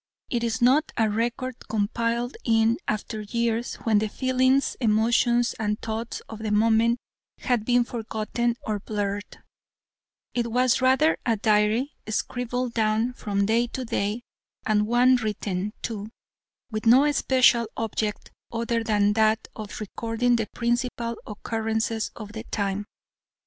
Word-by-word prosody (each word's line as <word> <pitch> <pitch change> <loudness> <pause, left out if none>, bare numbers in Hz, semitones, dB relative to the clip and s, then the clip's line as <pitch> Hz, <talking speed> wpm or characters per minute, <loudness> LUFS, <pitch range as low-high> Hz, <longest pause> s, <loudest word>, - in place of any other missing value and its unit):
It 235 -2 0
is 230 +1 -1
not 280 +6 +4
a 225 - +3
record 235 +4 -2
compiled 230 +3 -1
in 225 0 +3
after 215 +1 -3
years 235 +2 -1
when 220 -2 +3
the 215 0 -1
feelings, 260 +2 +2
emotions, 235 +1 +3
and 210 -1 -1
thoughts 225 +1 -4
of 220 - -8
the 220 -1 -3
moment 225 +2 +3 0.4
had 245 -5 0
been 245 0 +4
forgotten 235 0 -2
or 210 -1 -1
blurred, 205 0 -4 0.9
It 235 -1 -1
was 250 +1 +3
rather 265 +5 +3
a 230 -2 +1
diary 215 +5 +2 0.2
scribbled 245 +2 -2
down 220 +2 +1
from 200 -4 -1
day 230 +3 +2
to 255 +2 -5
day, 225 0 -2 0.4
and 210 -1 +2
one 250 +2 +5
written, 210 -3 -2
too, 215 -2 -4 0.6
with 215 +1 -3
no 270 +6 +6
special 255 -4 +4
object 215 -1 -3 0.2
other 230 0 -1
than 205 -2 +2
that 220 0 +2
of 215 -2 -7
recording 225 +3 0
the 225 -2 -1
principal 240 -1 -1
occurrences 220 +1 -2
of 210 -2 -8
the 220 +1 -6
time. 200 0 -2
225 Hz, 135 wpm, -25 LUFS, 215-240 Hz, 0.9 s, no